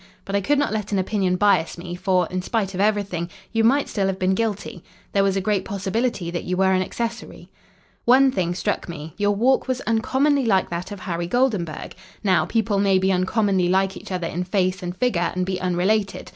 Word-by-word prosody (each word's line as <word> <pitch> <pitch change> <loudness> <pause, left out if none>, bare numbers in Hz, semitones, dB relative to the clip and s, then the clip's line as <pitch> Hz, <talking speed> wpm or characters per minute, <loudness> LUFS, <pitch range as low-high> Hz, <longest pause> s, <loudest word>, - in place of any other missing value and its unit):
But 195 - -3
I 200 - +2
could 290 +9 +2
not 285 -5 0
let 215 -1 -3
an 200 - +1
opinion 190 -1 0
bias 185 -4 +2
me, 175 0 -7
for, 180 0 +1
in 185 0 -2
spite 200 0 -1
of 185 - -2
everything, 200 -5 0 0.2
you 225 -1 +2
might 275 +5 +3
still 195 -3 -1
have 190 -1 -1
been 185 0 +1
guilty. 205 -4 -3 0.3
There 195 - +2
was 195 -1 +1
a 195 - 0
great 200 -1 0
possibility 200 -1 -2
that 175 - -3
you 180 0 -2
were 190 0 +3
an 185 - +2
accessory. 230 +4 -5 0.5
"One 265 +2 +6
thing 175 -5 -1
struck 200 0 -2
me. 160 -1 -7
Your 205 0 +1
walk 255 +7 +2
was 255 -1 -1
uncommonly 260 +4 +1
like 190 -5 +2
that 170 +4 -4
of 200 -2 -7
Harry 170 -1 -3
Goldenburg. 205 -8 -1 0.3
Now, 190 -3 +3
people 215 -3 0
may 195 -1 +3
be 190 +1 +2
uncommonly 190 0 +1
like 190 +1 +2
each 205 - -10
other 180 -2 -2
in 170 +2 -2
face 185 0 0
and 180 0 -5
figure 175 -9 +1
and 185 0 0
be 185 -1 -3
unrelated. 190 +3 0
195 Hz, 215 wpm, -23 LUFS, 180-215 Hz, 0.5 s, One